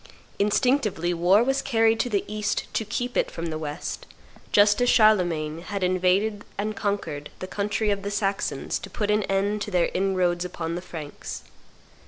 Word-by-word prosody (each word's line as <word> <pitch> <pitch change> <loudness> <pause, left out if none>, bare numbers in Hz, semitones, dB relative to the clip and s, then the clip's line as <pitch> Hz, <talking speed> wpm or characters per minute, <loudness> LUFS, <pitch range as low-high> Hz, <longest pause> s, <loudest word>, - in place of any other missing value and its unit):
Instinctively 210 - +2
war 180 +6 +4
was 270 +2 +1
carried 225 -3 +2
to 245 - +1
the 205 -3 0
East 210 -1 -2
to - - 0
keep 245 +3 -3
it - - +2
from 165 0 -5
the 155 - -3
West, 150 -1 -5 0.4
just 205 +2 +5
as 245 - +3
Charlemagne 175 -9 +3
had 200 +1 -4
invaded 185 +3 +1
and 210 +1 -2
conquered 165 -9 -3
the - - -5
country 205 +2 -1
of 200 -1 -1
the 200 - -3
Saxons 200 -1 -1
to - - -9
put 210 -2 -1
an 210 +1 +3
end 200 +2 0
to 210 - -3
their 180 -4 +1
inroads 180 -2 +1
upon 170 -2 -4
the 175 - -3
Franks. 155 -5 -7
200 Hz, 175 wpm, -25 LUFS, 175-215 Hz, 0.4 s, just